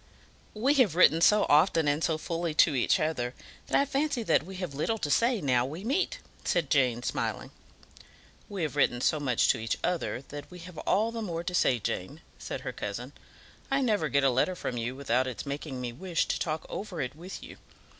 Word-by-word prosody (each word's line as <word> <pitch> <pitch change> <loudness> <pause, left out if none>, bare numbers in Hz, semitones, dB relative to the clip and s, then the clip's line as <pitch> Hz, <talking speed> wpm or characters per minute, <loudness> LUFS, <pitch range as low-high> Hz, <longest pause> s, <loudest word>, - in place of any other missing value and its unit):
"We 255 +7 +3
have 195 -10 +2
written 165 -2 +6
so 210 +4 +5
often 155 +1 +4
and 145 +2 +1
so 160 -2 +1
fully 165 0 -3
to 155 - +5
each 125 - +2
other 130 -6 -1 0.3
that - - +3
I 280 - +3
fancy 280 -2 -1
that - - +3
we 190 +4 -9
have 180 -5 -5
little 190 +11 -1
to 150 -8 -2
say 235 - +3
now 125 -4 +2
we 155 +9 -6
meet," 370 - 0 0.3
said 170 -6 0
Jane, 125 -4 +2
smiling. - - -3 1.0
"We 195 -4 -3
have 150 -2 -2
written 125 -4 +2
so 150 +4 +2
much 130 -5 +2
to 125 - +3
each 110 0 -2
other 165 -7 -1
that 145 0 -8
we 180 - -11
have 175 -1 -10
all 215 +4 +1
the 230 -1 -4
more 170 -5 -3
to 180 +1 -4
say, 130 -7 +3
Jane," 115 - -4 0.2
said - - -5
her - - -5
cousin. - - -5 0.6
"I 275 0 +2
never 210 - +1
get 140 0 +2
a 135 - +4
letter 130 +9 +1
from 130 - -4
you 120 +2 -3
without 130 -2 0
its 130 - -5
making 140 -1 -5
me 120 -1 -4
wish 170 +5 -1
to - - 0
talk 155 -1 -2
over 195 -5 -6
it 135 -1 -3
with 175 +4 -8
you. - - -11
160 Hz, 215 wpm, -29 LUFS, 135-190 Hz, 1.0 s, written